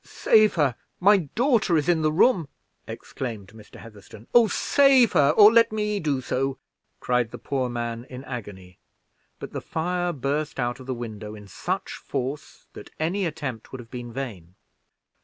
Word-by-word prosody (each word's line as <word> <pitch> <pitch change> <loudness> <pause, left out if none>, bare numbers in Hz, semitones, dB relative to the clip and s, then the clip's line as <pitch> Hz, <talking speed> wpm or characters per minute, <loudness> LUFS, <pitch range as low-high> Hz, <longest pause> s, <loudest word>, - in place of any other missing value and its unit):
"Save 215 -2 +3
her! 145 -7 +1 0.2
my 200 +3 +6 0.2
daughter 230 - +2
is 150 - -1
in 170 -2 +2
the 155 0 +2
room!" 170 - +3 0.4
exclaimed 110 -7 -7
Mr. 110 -1 -16
Heatherstone. 105 -1 -13
"Oh, 235 -2 +6
save 270 -1 +4
her, 140 -1 +4
or 210 +1 +8
let 230 -1 +5
me 210 -1 -1
do 145 -6 -1
so!" 135 +1 -2 0.4
cried 125 -2 0
the - - -8
poor 130 -3 -2
man, 120 0 -4
in 130 +1 -8
agony; 100 -8 -9 0.6
but - - -8
the - - -4
fire 175 +2 -2
burst 145 0 -3
out 120 0 -2
of 130 - -12
the 130 - -2
window 110 -3 -7
in 105 -1 -12
such 180 - -4
force, 135 +2 -6
that - - -11
any 175 +4 0
attempt 145 -8 -6
would 130 - -7
have 115 -1 -12
been 120 -1 -6
in 120 - -11
vain. 100 -10 -7
135 Hz, 175 wpm, -24 LUFS, 120-180 Hz, 0.6 s, or